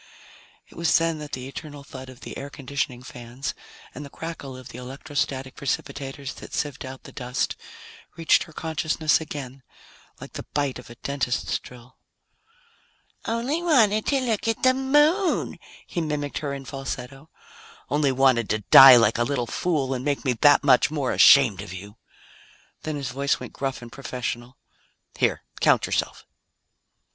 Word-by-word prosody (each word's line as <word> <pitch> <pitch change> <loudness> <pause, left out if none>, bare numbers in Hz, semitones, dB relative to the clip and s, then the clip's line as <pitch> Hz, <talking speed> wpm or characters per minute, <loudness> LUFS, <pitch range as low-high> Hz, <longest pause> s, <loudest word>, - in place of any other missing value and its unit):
It - - -19
was 170 0 +3
then 165 -1 0
that 150 0 -9
the 130 0 -4
eternal 145 0 -9
thud 130 -1 -10
of 130 -1 -14
the - - -8
air 140 - -6
conditioning 135 -3 -4
fans 125 +5 -6 0.4
and 150 - -7
the 140 - -9
crackle 145 -5 -7
of 130 - -11
the 125 - -9
electrostatic 135 0 -4
precipitators 135 0 -4
that - - -8
sieved 145 -3 -3
out 130 0 -9
the - - -11
dust 125 +2 -2 0.6
reached 165 -1 +3
her 165 - -15
consciousness 160 0 0
again 135 -4 -7 0.6
like - - -11
the - - -7
bite 145 -3 0
of 125 - -13
a 120 - -11
dentist's 135 0 -2
drill. 125 +1 -15 1.3
"Only 240 +8 -1
wanted 225 - +3
to 275 - +2
look 230 -3 -1
at 225 - -1
the 255 0 +6
Moon!" 295 +8 +2 0.3
he 175 - -3
mimicked 150 -2 -3
her 145 -2 -3
in 140 -1 -6
falsetto. 135 +2 -7 0.6
"Only 145 0 +1
wanted 130 -4 +3
to 105 -1 -1
die 135 -1 +12
like 115 -1 +4
a - - +3
little 125 -1 -1
fool 140 -1 -1
and 130 -1 -4
make 145 0 -1
me 130 - +2
that 145 +5 +5
much 130 -3 +5
more 145 -4 -1
ashamed 125 -10 +6
of 90 - -8
you!" 100 +3 -10 0.8
Then 155 -1 -4
his 140 -3 -4
voice 140 +2 0
went 125 - -9
gruff 135 -2 -4
and 120 - -10
professional. 125 -1 -5 0.6
"Here, - - 0 0.2
count - - +4
yourself." - - -2
140 Hz, 165 wpm, -24 LUFS, 125-155 Hz, 1.3 s, die